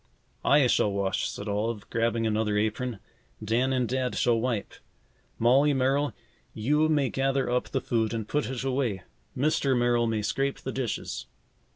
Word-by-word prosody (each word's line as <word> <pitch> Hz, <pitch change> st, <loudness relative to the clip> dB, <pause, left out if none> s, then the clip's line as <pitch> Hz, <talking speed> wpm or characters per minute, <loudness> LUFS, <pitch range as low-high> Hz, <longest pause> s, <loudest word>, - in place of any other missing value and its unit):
"I 145 Hz, -1 st, +5 dB
shall 105 Hz, -4 st, +2 dB
wash," 100 Hz, -1 st, -1 dB
said 100 Hz, -, -7 dB
Olive, 105 Hz, +1 st, -2 dB
grabbing 115 Hz, 0 st, +1 dB
another 105 Hz, -1 st, +1 dB
apron. 110 Hz, +3 st, -1 dB, 0.5 s
"Dan 120 Hz, +5 st, +1 dB
and 125 Hz, -2 st, +1 dB
Dad 130 Hz, +1 st, -1 dB
shall 120 Hz, -2 st, +2 dB
wipe. 115 Hz, -3 st, -2 dB, 0.6 s
Molly 135 Hz, +5 st, +4 dB
Merrill, 135 Hz, +2 st, +1 dB, 0.4 s
you 150 Hz, +8 st, +2 dB
may 145 Hz, -4 st, +2 dB
gather 135 Hz, -1 st, 0 dB
up 125 Hz, 0 st, 0 dB
the -, -, -1 dB
food 115 Hz, -2 st, 0 dB
and 110 Hz, -2 st, -3 dB
put 150 Hz, -2 st, -1 dB
it 130 Hz, -1 st, -4 dB
away. 130 Hz, -7 st, -1 dB, 0.3 s
Mr. 135 Hz, -1 st, +2 dB
Merrill 120 Hz, -1 st, +2 dB
may 110 Hz, -2 st, -1 dB
scrape 135 Hz, +5 st, -1 dB
the 130 Hz, -, -4 dB
dishes." 130 Hz, -3 st, -4 dB
120 Hz, 160 wpm, -27 LUFS, 110-135 Hz, 0.6 s, I